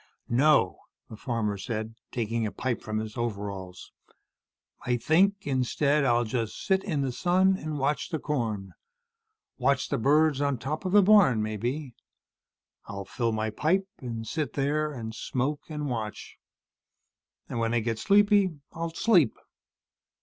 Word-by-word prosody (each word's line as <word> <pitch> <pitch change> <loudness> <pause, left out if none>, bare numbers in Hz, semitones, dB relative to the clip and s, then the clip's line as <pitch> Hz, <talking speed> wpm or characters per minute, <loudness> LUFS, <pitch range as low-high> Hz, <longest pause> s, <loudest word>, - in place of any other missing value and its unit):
"No," 145 +5 +3 0.3
the - - -6
farmer 105 -3 -2
said, 110 +1 -4 0.2
taking 115 -1 -1
a - - -5
pipe 125 -3 -2
from 110 0 -3
his 110 0 -4
overalls. 100 -5 -5 0.9
"I 125 0 +1
think 195 +10 +2
instead, 140 +2 +1
I'll 120 -2 +3
just 115 -1 -3
sit 190 0 +2
in 155 -8 -1
the 135 -2 -1
sun 185 +8 +3
and 155 -4 -4
watch 140 +2 -1
the 160 - -1
corn. 110 - -3 0.9
Watch 140 -1 +1
the - - 0
birds 145 +3 +3
on 140 -2 +1
top 150 +9 -4
of 185 - -1
the 205 0 +6
barn, 185 - +5
maybe. 120 +6 -3 0.9
I'll 100 -1 -6
fill 115 +3 -1
my 110 0 -1
pipe 185 - +1
and 115 -4 -5
sit 150 -7 -2
there 150 +2 0
and 115 -5 -6
smoke 135 +7 -3
and 150 -1 -4
watch. 110 -5 -5 1.1
And 115 - -4
when 115 +1 0
I - - +3
get 115 0 -2
sleepy, 200 - +4
I'll 165 +1 -3
sleep. 170 - +3
130 Hz, 150 wpm, -27 LUFS, 115-155 Hz, 1.1 s, the